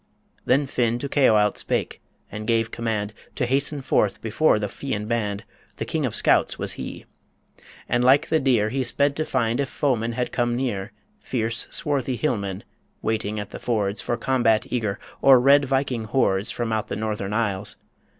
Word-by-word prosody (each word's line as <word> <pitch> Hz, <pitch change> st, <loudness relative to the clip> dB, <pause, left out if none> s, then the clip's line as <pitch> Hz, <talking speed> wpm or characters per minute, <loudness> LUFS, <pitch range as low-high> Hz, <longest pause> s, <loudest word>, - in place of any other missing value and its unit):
Then 135 Hz, +3 st, +3 dB
Finn 120 Hz, -3 st, 0 dB
to 140 Hz, -, -4 dB
Caoilte 110 Hz, -8 st, +3 dB
spake, -, -, -2 dB, 0.3 s
and 105 Hz, 0 st, -6 dB
gave 115 Hz, -1 st, +1 dB
command 110 Hz, -3 st, -2 dB, 0.2 s
To 125 Hz, -, 0 dB
hasten 140 Hz, +2 st, 0 dB
forth 105 Hz, -5 st, +1 dB
before 115 Hz, +5 st, +2 dB
the 105 Hz, -1 st, -2 dB
Fian 105 Hz, -1 st, -4 dB
band 105 Hz, -2 st, -2 dB, 0.3 s
The -, -, -4 dB
King -, -, -1 dB
of -, -, -4 dB
Scouts -, -, +3 dB
was -, -, -2 dB
he! -, -, -7 dB, 0.8 s
And 120 Hz, +1 st, +1 dB
like 140 Hz, +5 st, +4 dB
the 160 Hz, -, +3 dB
deer 120 Hz, -6 st, +2 dB
He 135 Hz, +4 st, -1 dB
sped 140 Hz, +3 st, +1 dB
to 155 Hz, -, 0 dB
find 120 Hz, -3 st, 0 dB
if 140 Hz, -2 st, 0 dB
foemen 120 Hz, -5 st, 0 dB
had 125 Hz, +1 st, -2 dB
come 120 Hz, -1 st, 0 dB
near 120 Hz, -7 st, -2 dB, 0.3 s
Fierce, 115 Hz, -2 st, -2 dB
swarthy 140 Hz, -5 st, 0 dB
hillmen, 100 Hz, -7 st, -2 dB, 0.4 s
waiting 110 Hz, -1 st, -1 dB
at 105 Hz, -, -6 dB
the -, -, -7 dB
fords 105 Hz, -4 st, -1 dB
For 120 Hz, -, -2 dB
combat 115 Hz, -3 st, +2 dB
eager, 110 Hz, -5 st, -1 dB, 0.2 s
or 135 Hz, -2 st, +7 dB
red 140 Hz, +3 st, +5 dB
Viking 130 Hz, -3 st, -1 dB
hordes 105 Hz, -4 st, +1 dB
From 115 Hz, -2 st, -2 dB
out 110 Hz, -1 st, -1 dB
the -, -, -4 dB
Northern 105 Hz, -2 st, -3 dB
isles 105 Hz, -3 st, -1 dB
115 Hz, 175 wpm, -24 LUFS, 105-130 Hz, 0.8 s, or